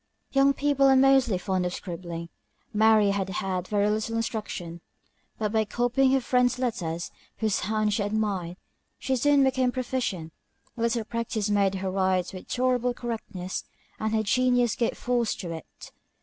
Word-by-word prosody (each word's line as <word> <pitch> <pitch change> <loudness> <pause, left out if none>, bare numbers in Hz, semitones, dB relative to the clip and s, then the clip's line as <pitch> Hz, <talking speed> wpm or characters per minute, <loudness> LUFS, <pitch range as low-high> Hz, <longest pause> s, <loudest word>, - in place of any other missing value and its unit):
Young 275 0 +4
people 280 -1 +3
are 265 - +6
mostly 265 -6 +4
fond 185 0 -1
of 180 0 -2
scribbling; 170 -2 -6 0.4
Mary 215 -1 +5
had 195 -1 -1
had 185 -1 -2
very 205 -1 +1
little 215 +2 -1
instruction; 200 -7 -4 0.6
but 210 -2 -1
by 220 0 +2
copying 245 +5 +1
her 270 - +3
friend's 250 +1 +2
letters, 180 -10 -3 0.3
whose 215 -3 0
hand 215 +1 0
she 210 - 0
admired, 200 -4 -1 0.4
she 265 - -1
soon 285 +2 +4
became 260 -1 +2
a - - -5
proficient; 240 -11 -3 0.4
a 230 - -6
little 230 0 +1
practice 220 -2 -2
made 200 -1 +2
her 190 0 -2
write 185 -1 0
with 185 - -9
tolerable 250 -1 +1
correctness, 220 -7 -5 0.4
and 220 0 -1
her 220 - +1
genius 245 +1 +2
gave 235 - -1
force 240 -2 0
to 175 -3 -6
it. 165 -1 -10
220 Hz, 165 wpm, -26 LUFS, 190-245 Hz, 0.6 s, are